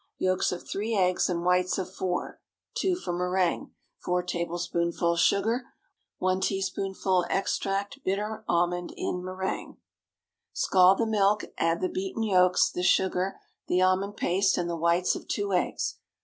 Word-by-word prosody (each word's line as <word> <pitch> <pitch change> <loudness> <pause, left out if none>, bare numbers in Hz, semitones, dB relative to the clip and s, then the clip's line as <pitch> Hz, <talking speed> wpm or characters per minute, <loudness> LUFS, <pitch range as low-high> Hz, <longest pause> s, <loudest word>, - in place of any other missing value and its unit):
Yolks 185 0 +1
of 180 - -6
three 220 +3 -2
eggs 185 -2 +2
and 175 -1 -2
whites 180 0 +2
of 185 0 -4
four—(two 355 - -3
for 265 - -4
méringue). 180 0 0 0.3
4 180 0 -1
tablespoonfuls 170 -1 -1
sugar. 225 +8 +2 0.5
1 185 0 0
teaspoonful 190 -1 0
extract 195 +4 -1
bitter 210 +3 -2
almond 175 +1 +1
in 180 - -2
méringue. 185 +1 -4 0.8
Scald 185 0 +5
the 230 - +1
milk, 210 -1 +2
add 165 0 +1
the 185 - +1
beaten 195 +5 -3
yolks, 180 -3 +4
the 180 - -3
sugar, 185 +1 +2 0.3
the 180 - +2
almond 185 +2 +1
paste, 190 +2 +2
and 175 - -1
the 170 - -2
whites 170 +2 +2
of - - -8
two 205 -1 -2
eggs. 180 - -1
185 Hz, 140 wpm, -27 LUFS, 180-195 Hz, 0.8 s, Scald